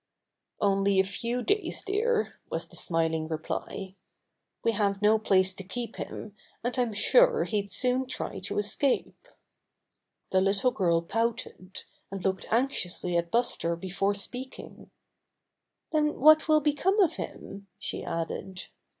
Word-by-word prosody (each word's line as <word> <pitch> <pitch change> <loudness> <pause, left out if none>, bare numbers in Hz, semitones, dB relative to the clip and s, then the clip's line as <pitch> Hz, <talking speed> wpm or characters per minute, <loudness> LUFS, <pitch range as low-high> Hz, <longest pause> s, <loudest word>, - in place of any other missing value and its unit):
"Only 195 -1 +2
a - - +6
few 235 +5 -3
days, 410 +1 0
dear," 435 +3 0
was - - -3
the - - -15
smiling 160 -1 0
reply. 175 +4 -4 0.7
"We 230 - +3
have 200 -2 0
no 215 +1 +4
place 190 -3 +3
to 190 - -9
keep 235 +6 -5
him, 210 -1 -7 0.3
and 245 +1 -1
I'm 245 -3 +1
sure - - +5
he'd 205 -2 -2
soon 250 +6 +1
try 255 - -4
to 190 - -4
escape." 235 - 0 1.0
The 185 - +4
little 195 +6 +3
girl 170 -6 +1
pouted, 225 -2 -3 0.3
and 195 -1 -6
looked 190 -1 -1
anxiously 200 -7 0
at 170 0 +1
Buster 200 -7 +1
before 195 +3 -1
speaking. 250 +6 -7 1.0
"Then 300 -1 +1
what 310 +3 +7
will 310 -1 +5
become 310 +8 +1
of 370 -5 +3
him?" 195 0 -7
she - - -4
added. 180 +3 -4
205 Hz, 135 wpm, -28 LUFS, 190-255 Hz, 1.0 s, what